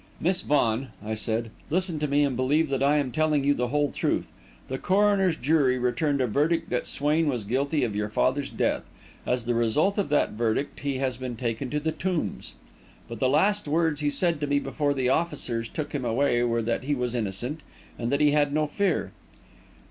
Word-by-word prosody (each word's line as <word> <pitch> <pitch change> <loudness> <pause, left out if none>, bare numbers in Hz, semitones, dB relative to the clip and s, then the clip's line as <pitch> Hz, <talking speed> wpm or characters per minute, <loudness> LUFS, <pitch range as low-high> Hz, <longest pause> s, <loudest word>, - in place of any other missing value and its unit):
"Miss 180 +2 +1
Vaughan," 130 -3 +1 0.2
I 110 - -2
said, 110 +1 -2 0.2
"listen 175 -1 +1
to 150 - 0
me 145 +1 +3
and 140 -3 0
believe 145 +5 +2
that 135 -1 -1
I 145 +2 +4
am 140 -3 0
telling 155 0 +1
you 145 +1 +4
the 125 -3 -1
whole 145 +1 0
truth. - - -1 0.4
The 130 0 -4
coroner's 195 -2 +3
jury 140 -3 +2
returned 130 +3 0
a - - +3
verdict 160 +8 0
that 125 - -1
Swain 150 +3 +1
was 125 -7 -1
guilty 140 +7 0
of 105 -4 -1
your 105 0 -1
father's 130 +6 0
death. - - 0 0.5
As 125 -2 0
the 120 - +1
result 145 - +2
of 195 - -1
that 145 - +2
verdict, 115 +5 -1
he 140 -2 -2
has 130 -2 -1
been 130 -1 -5
taken 115 +2 -3
to 150 - -1
the 160 +2 -1
Tombs. 170 - -3 0.5
But 115 -1 -7
the 130 - +2
last 195 +7 +2
words 155 -1 +1
he 145 - +2
said 165 0 0
to 145 - 0
me 145 0 +2
before 140 +1 -1
the 130 -2 +1
officers 130 -7 -1
took 155 - -5
him 140 -3 -2
away 120 +1 +1
were 115 -1 +1
that 115 +1 -1
he 145 +1 +1
was 125 -2 -2
innocent, 120 +7 -3 0.4
and 120 +1 -2
that 140 +1 +1
he 150 -1 +5
had 145 -1 +2
no 155 +1 +1
fear." 150 - -1
140 Hz, 210 wpm, -26 LUFS, 120-150 Hz, 0.5 s, he